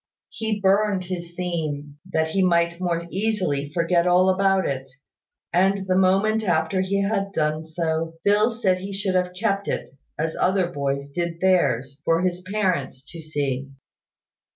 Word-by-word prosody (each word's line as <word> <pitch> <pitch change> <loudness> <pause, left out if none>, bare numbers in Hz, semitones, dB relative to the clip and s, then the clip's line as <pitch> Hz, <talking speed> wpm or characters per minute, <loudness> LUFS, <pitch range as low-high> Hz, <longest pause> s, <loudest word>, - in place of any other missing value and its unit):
He 220 -2 -3
burned 200 0 +2
his 175 -1 -6
theme, 150 -5 -4
that 160 -1 +1
he 195 +4 +1
might 170 -1 +2
the - - -5
more 170 -1 -1
easily 185 -9 -1
forget 170 +1 +2
all 180 +1 +5
about 195 0 +2
it; 135 -1 -4 0.6
and 195 +2 +2
the 185 -1 +1
moment 195 +4 +3
after 175 0 +1
he 200 +1 0
had 195 -1 -1
done 155 0 -1
so, 160 0 -2
Phil 210 +3 +4
said 200 -5 +1
he 195 +2 -6
should 195 -1 -1
have 180 0 0
kept 200 -2 0
it, - - -3 0.2
as 160 +1 -2
other 185 -1 +2
boys 140 -2 -2
did 170 +3 -3
theirs, 140 -7 +1
for 165 +2 +2
his 180 -1 -1
parents 185 -9 -1
to 165 - -8
see. 140 -3 -3
180 Hz, 160 wpm, -23 LUFS, 160-195 Hz, 0.6 s, all